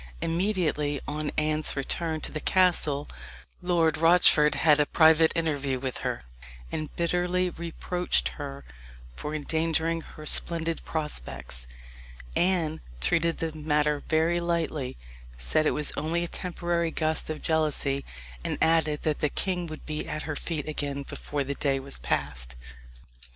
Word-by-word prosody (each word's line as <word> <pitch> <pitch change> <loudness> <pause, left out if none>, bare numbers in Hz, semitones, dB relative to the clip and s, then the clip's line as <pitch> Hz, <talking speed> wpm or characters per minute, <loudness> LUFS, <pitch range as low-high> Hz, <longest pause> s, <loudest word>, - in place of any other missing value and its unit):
Immediately 165 -5 0
on 150 0 -2
Anne's 155 0 +1
return 160 +3 0
to - - -4
the 155 - -3
castle 160 -6 +2 0.5
Lord 170 -3 +2
Rochford 165 -3 +6
had 150 -2 +5
a 145 - +3
private 160 0 +6
interview 145 -5 0
with 130 -1 -3
her, - - -3 0.5
and 155 -1 -3
bitterly 180 +1 +1
reproached 170 +2 -1
her 140 -2 -7 0.5
for 150 - -4
endangering 160 +2 0
her 155 -1 -11
splendid 165 +1 0
prospects. 65 - -5 0.7
Anne 170 -4 +1 0.2
treated 165 - +2
the 165 -1 -2
matter 150 -1 +1
very 165 +2 +3
lightly 165 -6 -1 0.4
said - - +2
it - - +1
was 150 - +1
only 165 +3 0
a - - -2
temporary 175 -1 -1
gust 160 -1 -1
of 155 -1 -4
jealousy 150 -3 +1 0.4
and - - -2
added 160 -2 +2
that 155 -2 0
the 150 - +2
king 180 +2 -1
would 155 -1 -8
be 155 0 -3
at 155 - -3
her 155 - -3
feet 155 -1 -3
again 145 -2 -2
before 145 +1 -3
the 140 +1 -3
day 135 -1 0
was 135 +1 -6
past. 65 -4 -1
155 Hz, 140 wpm, -28 LUFS, 145-165 Hz, 0.7 s, Rochford